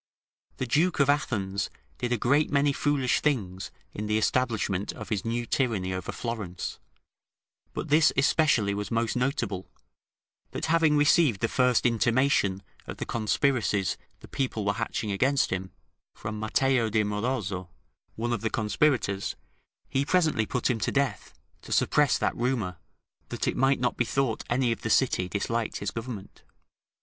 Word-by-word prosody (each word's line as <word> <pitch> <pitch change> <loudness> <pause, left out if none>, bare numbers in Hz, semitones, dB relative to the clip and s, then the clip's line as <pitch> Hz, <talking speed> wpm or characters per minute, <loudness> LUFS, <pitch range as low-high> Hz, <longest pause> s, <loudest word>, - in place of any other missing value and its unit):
The 130 - -2
Duke 155 +9 +2
of 140 0 +5
Athens 100 -9 -1 0.3
did 120 - -2
a 120 - +2
great 145 +7 +2
many 140 0 +2
foolish 140 -3 +1
things 100 -11 -1 0.2
in 105 +1 -4
the 105 0 +2
establishment 110 -5 0
of - - -9
his 100 -3 -1
new 120 +1 -2
tyranny 110 -9 0
over 95 -1 -4
Florence: 105 -7 -5 0.9
but - - -4
this 155 +2 +5
especially 135 -7 +3
was 100 0 -4
most 115 -1 0
notable, 120 - -1 0.8
that - - -2
having 160 -2 +3
received 145 - +4
the 115 - +1
first 125 0 +2
intimation 115 -4 +2 0.2
of - - -6
the - - -4
conspiracies 110 -3 +1 0.3
the - - -12
people 125 -6 -2
were 100 - +2
hatching 110 -1 -3
against 135 +8 +2
him, 95 0 -3 0.5
from 105 0 -5
Matteo 120 +2 +2
di 110 0 +2
Morozzo, 105 -4 -2 0.5
one 120 +2 -1
of 115 - -2
the 110 - 0
conspirators, 110 -2 0 0.5
he 135 - 0
presently 155 - +2
put 125 - -1
him 125 -3 0
to - - 0
death, 140 -1 -1 0.3
to - - -12
suppress - - +3
that - - 0
rumour, 115 -8 -1 0.5
that - - -3
it - - 0
might 135 +1 +3
not 125 0 0
be 120 - +2
thought 130 -2 -1
any 120 0 +2
of 115 - -3
the 110 - -3
city 105 -7 +2
disliked 115 +4 -2
his 100 -1 -3
government. 115 -4 -7
115 Hz, 160 wpm, -27 LUFS, 105-135 Hz, 0.9 s, of